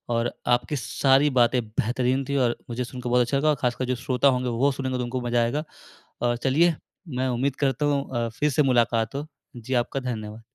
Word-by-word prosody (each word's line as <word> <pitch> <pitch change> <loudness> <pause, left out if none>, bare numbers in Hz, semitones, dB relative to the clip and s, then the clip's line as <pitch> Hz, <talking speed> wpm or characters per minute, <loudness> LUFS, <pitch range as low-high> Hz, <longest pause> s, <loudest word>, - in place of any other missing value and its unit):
और 115 +1 0 0.2
आपकी 120 +4 +1
सारी 135 +2 +2
बातें 125 -1 +3
बेहतरीन 125 +4 0
थी 140 - 0
और 120 -2 +2
मुझे 120 +1 -2
सुनकर 125 0 -6
बहुत 125 0 +4
अच्छा 125 +3 +1
लगा 155 +2 +2
और 150 - +3
खासकर 125 0 0
जो 125 - -1
श्रोता 125 +2 +1
होंगे, 125 -2 +2
वो 130 +5 +2
सुनेंगे, 130 -1 -3
तो 125 - -2
उनको 125 +1 -3
मज़ा 120 0 +1
आएगा। 140 +6 -1 0.6
अ, 120 0 +1
चलिए, 155 +7 +2 0.3
मैं 130 -3 -2
उम्मीद 130 +2 0
करता 140 +1 0
हूँ 140 -1 +1 0.2
अ, - - -3
फिर 150 0 +3
से 150 +2 +2
मुलाकात 120 -3 +2
हो। 145 +2 -3 0.3
जी, 120 +2 -5
आपका 125 +2 0
धन्यवाद। 110 -3 -5
125 Hz, 210 wpm, -25 LUFS, 120-135 Hz, 0.6 s, बहुत